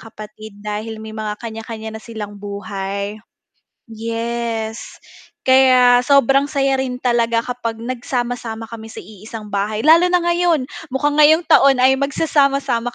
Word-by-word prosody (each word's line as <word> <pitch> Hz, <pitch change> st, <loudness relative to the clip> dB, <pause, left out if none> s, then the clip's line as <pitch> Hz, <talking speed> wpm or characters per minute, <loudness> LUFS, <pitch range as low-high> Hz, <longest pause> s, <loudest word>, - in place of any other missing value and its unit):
kapatid 215 Hz, -1 st, -11 dB
dahil 215 Hz, +1 st, -5 dB
may 220 Hz, 0 st, -8 dB
mga 215 Hz, -1 st, -4 dB
kanya-kanya 220 Hz, -1 st, -7 dB
na -, -, -9 dB
silang 210 Hz, -3 st, -8 dB
buhay. 200 Hz, 0 st, -5 dB, 0.7 s
Yes, 230 Hz, 0 st, -4 dB, 0.4 s
kaya 255 Hz, -2 st, +5 dB
sobrang 275 Hz, 0 st, +4 dB
saya 275 Hz, -2 st, 0 dB
rin 255 Hz, -1 st, -3 dB
talaga 235 Hz, -2 st, +1 dB
kapag 245 Hz, -2 st, -4 dB
nagsama-sama 240 Hz, -2 st, -4 dB
kami 225 Hz, -1 st, -9 dB
sa -, -, -9 dB
iisang 215 Hz, +2 st, -10 dB
bahay 205 Hz, +2 st, -2 dB
lalo 330 Hz, +4 st, +6 dB
na 360 Hz, -1 st, +2 dB
ngayon, 345 Hz, -3 st, +1 dB, 0.3 s
mukhang 290 Hz, +2 st, 0 dB
ngayong 310 Hz, +3 st, +6 dB
taon 275 Hz, -2 st, +5 dB
ay 265 Hz, +1 st, +4 dB
magsasama-sama 275 Hz, -4 st, 0 dB
235 Hz, 130 wpm, -19 LUFS, 220-270 Hz, 0.7 s, lalo